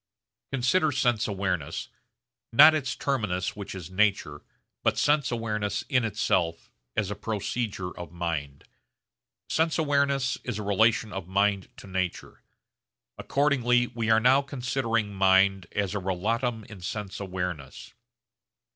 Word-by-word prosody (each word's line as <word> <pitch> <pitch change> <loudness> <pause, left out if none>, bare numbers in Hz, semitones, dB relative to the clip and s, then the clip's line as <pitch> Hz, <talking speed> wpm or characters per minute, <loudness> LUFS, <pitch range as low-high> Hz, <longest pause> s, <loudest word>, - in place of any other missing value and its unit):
Consider 140 +5 +2
sense 120 -5 +1
awareness 95 -7 -2 0.6
not 150 +7 +9
its 145 -5 -1
terminus 105 -10 -1
which 100 -2 -7
is 90 -2 -8
nature, 95 -7 +1 0.4
but - - +1
sense 145 -1 +2
awareness 110 -2 -2
in 125 -4 +3
itself 90 -6 -1 0.2
as 105 -2 0
a - - -3
procedure 105 -2 -3
of 85 -1 -8
mind. 85 -5 -4 0.9
Sense 160 0 +1
awareness 140 -4 +1
is - - -3
a 105 - -4
relation 110 +2 +2
of 95 -3 -5
mind 100 0 +1
to - - -11
nature. 95 -2 -4 0.8
Accordingly 125 -4 +2
we 115 -2 -3
are 110 0 +6
now 130 +4 +5
considering 125 -6 -2
mind 95 -1 +3
as 100 -2 -1
a 105 - -1
relatum 110 +5 -1
in 105 -4 -12
sense 100 +2 -5
awareness. 90 -7 -5
105 Hz, 130 wpm, -27 LUFS, 95-125 Hz, 0.9 s, not